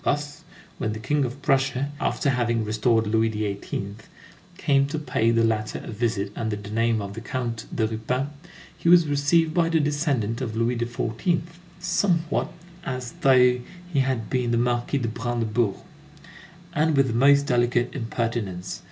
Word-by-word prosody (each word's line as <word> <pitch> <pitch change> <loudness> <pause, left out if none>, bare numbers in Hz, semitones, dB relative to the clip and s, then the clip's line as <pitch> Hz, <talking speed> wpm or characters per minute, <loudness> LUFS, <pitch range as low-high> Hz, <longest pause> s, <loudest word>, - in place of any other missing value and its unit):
Thus, 145 +2 -2 0.4
when 110 -4 -1
the 110 - -6
King 145 +5 +1
of 130 +4 -7
Prussia, 135 +1 +1
after 140 - +1
having 120 -3 0
restored 110 +1 +2
Louis 110 +1 +2
XVIII., 100 -1 -4 0.6
came 140 -5 +2
to 155 +2 -3
pay 145 -6 0
the 115 0 +3
latter 110 -1 0
a - - -7
visit 105 -3 -1
under 110 -2 -2
the 105 0 -8
name 115 -1 +1
of 100 0 -6
the 115 - -7
Count 115 -2 -4
de 110 - +2
Ruppin, 125 +5 -2 0.5
he 170 - 0
was 175 -1 +7
received 150 +3 +2
by 165 -1 +2
the 165 -1 +3
descendant 145 -6 0
of 115 -4 -3
Louis 115 +2 +1
XIV. 120 +7 -1 0.4
somewhat 175 -2 0 0.3
as 130 -4 -4
though 125 -2 +5 0.3
he 140 - +3
had 130 -5 0
been 125 -2 0
the 120 - +2
Marquis 120 +3 0
de 120 -4 -1
Brandebourg, 115 -2 -1 1.0
and 155 0 +2
with 135 - +5
the 120 - -2
most 140 +4 +5
delicate 120 -1 +1
impertinence. 115 -7 -3
120 Hz, 160 wpm, -25 LUFS, 110-140 Hz, 1.0 s, was